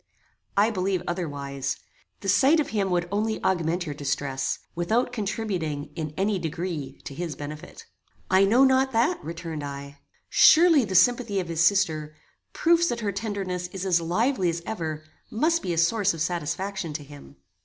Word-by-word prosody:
"I 210 +3 +4
believe 190 -2 -1
otherwise. 145 -6 -3 0.4
The - - -6
sight 275 - +5
of 300 - 0
him 200 -3 0
would 175 -1 0
only 215 +2 0
augment 175 -1 0
your 150 - -4
distress, 140 -2 -2 0.2
without 225 +9 0
contributing, 190 -9 -3
in 155 -2 -5
any 200 0 +1
degree, 165 -3 -4
to - - -6
his 165 +1 -4
benefit." 150 - -9 0.4
"I 190 +1 +4
know 235 +7 +5
not 265 0 +3
that," 235 +10 +1
returned 165 -2 -6
I. 140 0 -7 0.3
"Surely 320 -5 +6
the 190 -2 -4
sympathy 225 +1 +3
of 175 -2 -4
his 165 -1 -1
sister, 160 -5 +1 0.4
proofs 340 +1 +3
that 235 -6 -2
her 205 -2 -1
tenderness 195 -4 -3
is 190 +1 -6
as 175 -3 +3
lively 185 +4 +1
as 170 0 -3
ever, 160 -7 -4 0.3
must 320 +9 +1
be 180 - -3
a 170 - -2
source 195 +2 +2
of 160 - -6
satisfaction 175 +2 -2
to 150 0 -5
him. 145 0 -13
180 Hz, 165 wpm, -26 LUFS, 155-215 Hz, 0.4 s, Surely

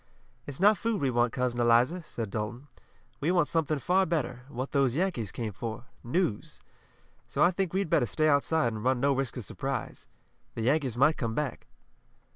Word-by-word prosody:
"It's 140 -2 -6
not 205 +2 +5
food 225 -3 -1
we 135 -2 +1
want, 120 0 +2
Cousin 125 -1 -1
Eliza," 120 +9 +3
said 115 -9 -6
Dalton. 120 +7 -4 0.5
"We 150 - 0
want 175 -4 +3
something 155 -2 0
far 185 +7 +2
better, 130 -6 -2
what 130 -1 -5
those 135 -3 +2
Yankees 155 - -1
came 110 -3 -4
for 110 +5 -5 0.2
news. 135 - -1 0.7
So - - +1
I 175 - +5
think 185 -1 -2
we'd 195 0 0
better 120 - +2
stay 155 +10 +1
outside 145 -3 +2
and 105 -1 -6
run 130 0 +2
no 140 +2 +3
risk 135 -1 -2
of 120 - -5
surprise. 135 -3 -5 0.5
The 115 - -3
Yankees 130 -2 +1
might 150 +5 +4
come 115 -3 -2
back." 150 -5 -3
135 Hz, 185 wpm, -29 LUFS, 120-160 Hz, 0.7 s, not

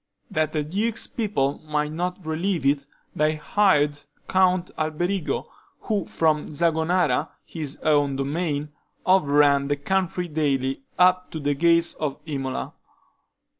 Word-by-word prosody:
That 155 -1 0
the 155 -1 0
duke's 210 +9 -1
people 190 - -1
might 150 -1 -1
not 180 +2 -3
relieve 165 0 -1
it, 140 0 +2 0.3
they 155 +1 +2
hired 150 -4 +2 0.3
Count 185 -1 +2
Alberigo, 165 +3 -1 0.4
who 205 -5 -1
from 155 -2 +1
Zagonara, 160 -2 +1 0.2
his 150 -3 -5
own 145 -3 +3
domain, 145 +1 -2 0.4
overran 145 -6 +4
the 145 - +1
country 180 +3 -1
daily, 135 -4 0 0.2
up 180 0 +4
to 160 - -5
the 145 0 0
gates 170 +3 +3
of 150 -3 -3
Imola. 135 -4 -4
155 Hz, 125 wpm, -24 LUFS, 145-180 Hz, 0.4 s, overran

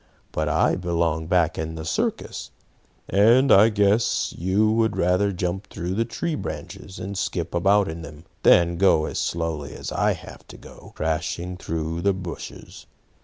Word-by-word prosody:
"But - - -1
I - - +2
belong 85 -3 -1
back 85 -2 +1
in 80 0 -4
the 80 -1 -6
circus, - - -2 0.6
and 115 +8 +4
I 105 +3 +7
guess 105 +1 +1
you 95 +5 +2
would 110 -1 +1
rather 90 +3 +2
jump 90 +1 -3
through 90 -1 -4
the 115 +4 0
tree 120 +9 -3
branches, 90 - -7
and 100 +2 -5
skip 90 -3 -3
about 100 +3 +3
in 80 +1 -6
them, 75 +1 -11 0.2
than 85 0 +5
go 90 -4 +4
as - - -3
slowly 80 -4 -3
as - - -6
I - - +2
have - - -12
to - - -12
go, - - -14
crashing 80 +3 -2
through 80 -1 -4
the 100 +1 +2
bushes. 90 -2 -8
90 Hz, 165 wpm, -24 LUFS, 80-100 Hz, 0.6 s, I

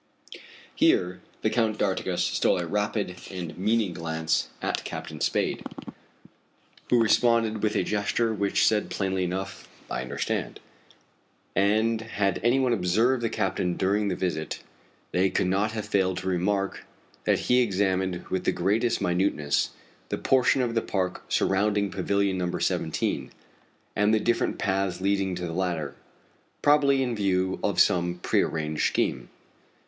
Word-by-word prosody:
Here 90 0 +2 0.2
the - - +2
Count 110 -3 +1
d'Artigas - - 0
stole - - +2
a 90 - -2
rapid 105 -1 -2
and 90 -4 -6
meaning 105 0 +1
glance 80 -1 -1
at - - -2
Captain - - -7
Spade, - - 0 1.3
who 120 - +4
responded 115 -1 +3
with 105 0 0
a - - +2
gesture 105 +2 0
which 100 -1 +1
said 105 -1 +2
plainly 95 -1 -1
enough: 95 +2 -4 0.2
"I 65 - -1
understand." 65 - -3 1.0
And 110 +4 +2
had 100 -4 -1
any 120 +3 +4
one 130 -2 +2
observed 115 +6 +2
the 115 - 0
captain 95 -5 -1
during 100 +2 +1
the 95 - 0
visit, 80 -4 -3 0.5
they 95 +1 +2
could - - 0
not 100 +4 +1
have 110 -2 -3
failed 95 -3 +1
to 95 - -4
remark 95 +2 0 0.4
that - - +2
he 125 0 +3
examined 95 -4 0
with 95 -1 -2
the - - +3
greatest 110 +6 +1
minuteness 90 -5 +1 0.4
that - - -4
portion 130 0 +3
of 120 -2 -1
the 115 - +1
park 95 -4 -2
surrounding 100 0 +1
Pavilion 100 +1 0
No. 90 -1 -1
17, - - -1 0.7
and 105 +1 +3
the 110 - +4
different 120 +2 0
paths 95 -2 -1
leading 95 -1 0
to 90 0 -4
the 80 - -4
latter 85 -5 -2 0.7
probably 140 -2 +4
in 125 -2 -2
view 95 -2 0
of - - 0
some 85 -1 +3
prearranged 75 -1 +1
scheme. - - -1
100 Hz, 145 wpm, -26 LUFS, 90-110 Hz, 1.3 s, who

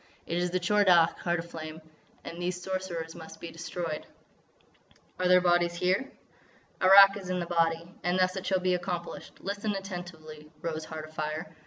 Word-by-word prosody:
It 170 +1 -1
is 180 0 0
the 185 +1 0
Tchor 205 +4 +3
Dagh, 170 -3 +5
Heart 175 0 0
of 170 +1 -8
Flame. 155 0 -7 0.4
And 170 +1 -7
these 180 0 -2
Sorcerers 180 -3 -4
must 160 -1 -11
be 170 - -7
destroyed." 165 -1 -5 1.1
"Are 185 - +2
their 180 0 +6
bodies 175 -1 +2
here?" 185 +10 +1 0.7
"Arrak 195 +1 +9
is 190 -2 -8
in 180 0 0
the 175 - -2
body. 165 0 0
And 175 +1 +1
thus 185 0 +2
it 190 - -4
shall 190 -1 +2
be 185 0 +2
accomplished: 175 -1 -4
listen 205 +1 -2
attentively, 175 -5 -8
Rose 160 -1 -3
Heart 155 -1 -7
Afire! 155 +1 -4
175 Hz, 175 wpm, -29 LUFS, 165-185 Hz, 1.1 s, Arrak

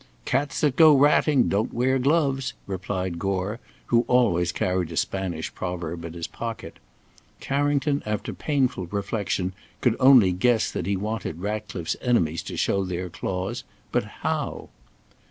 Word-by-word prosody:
"Cats 140 -1 0
that 145 -4 +2
go 155 -3 +8
ratting, 145 -1 +4
don't 105 +4 0
wear 130 +2 +1
gloves," 135 -2 +1
replied 95 -2 -3
Gore, 100 +3 -2 0.3
who 115 - +6
always 95 -9 +3
carried 90 0 -1
a 80 - -5
Spanish 90 -5 -2
proverb 85 -2 -4
in 85 - -7
his 85 -1 -5
pocket. 115 -2 -6 0.6
Carrington, 145 +1 0
after 105 -1 -3
painful 130 - 0
reflection, 100 -1 -2 0.3
could 120 -3 +2
only 130 -8 +7
guess 110 +5 +2
that 90 - -3
he 100 -1 +1
wanted 105 -5 -4
Ratcliffe's 100 -4 -3
enemies 85 -10 +1
to - - -6
show 100 - +1
their 90 -1 -4
claws. 90 +2 -3 0.3
But - - +1 0.2
how? - - -2
100 Hz, 140 wpm, -25 LUFS, 90-130 Hz, 0.6 s, go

